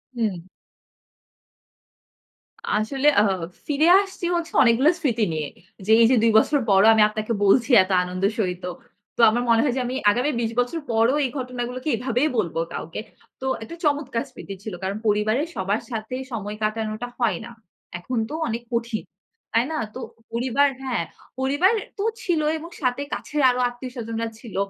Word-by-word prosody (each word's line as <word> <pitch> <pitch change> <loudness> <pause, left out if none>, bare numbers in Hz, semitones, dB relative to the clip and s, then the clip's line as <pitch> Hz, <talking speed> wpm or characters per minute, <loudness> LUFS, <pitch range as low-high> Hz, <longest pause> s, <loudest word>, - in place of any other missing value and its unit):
হুম। 210 -8 -2 2.3
আসলে 265 +7 0
অ্যা 205 - +6 0.4
ফিরে 300 +2 +2
আসছি 385 -3 -6
হচ্ছে, 340 -1 -2
অনেকগুলো 250 +5 +4
স্মৃতি 235 -8 +1
নিয়ে। 155 -2 -3 0.4
যে 215 - +1
এই - - +8
যে, 260 - +5
২ 230 - +5
বছর 290 +5 +2
পরও 195 +2 +6
আমি 220 - +4
আপনাকে 215 +2 -3
বলছি 235 +5 +4
এত 185 - -6
আনন্দের 185 +3 -1
সহিত। 180 -3 -1 0.5
তো - - +2
আমার 240 +3 0
মনে 230 -1 +5
হয় 265 -5 +1
যে, 255 - +1
আমি 250 +2 -3 0.2
আগামী 250 +7 0
২০ 230 -1 -1
বছর 245 +7 0
পরও 230 +4 +3
এই 260 - 0
ঘটনাগুলোকে 250 +1 -4
এভাবেই 250 +5 0
বলব 175 -6 -1 0.2
কাউকে। 165 - -5 0.4
তো 265 - -4 0.2
একটা 225 - -8
চমৎকার 285 -6 0
স্মৃতি 195 - -8
ছিল। 215 -3 -6
কারণ 195 +2 -2
পরিবারের 215 +8 +1
সবার 200 +1 -1
সাথে 225 +2 -4 0.2
সময় 210 -2 -4
কাটানোটা 215 +2 -2
হয় 220 -8 +1
না। 240 - -10 0.5
এখন 245 +8 -4
তো - - -6
অনেক 230 +1 -3
কঠিন। 235 -1 -1 0.5
তাই 230 +2 +3
না? 315 - -2 0.2
তো - - -5 0.3
পরিবার 255 +4 +2 0.2
হ্যাঁ, 245 -9 -1 0.4
পরিবার 285 +11 +3 0.2
তো 400 - -2 0.2
ছিল 335 -4 +1 0.2
এবং 325 +2 -9
সাথে 255 +1 0
কাছের 300 0 -2
আরো 250 0 0
আত্মীয়স্বজনরা 240 -2 -5
ছিল। 230 -4 -11
235 Hz, 165 wpm, -23 LUFS, 215-265 Hz, 2.3 s, এই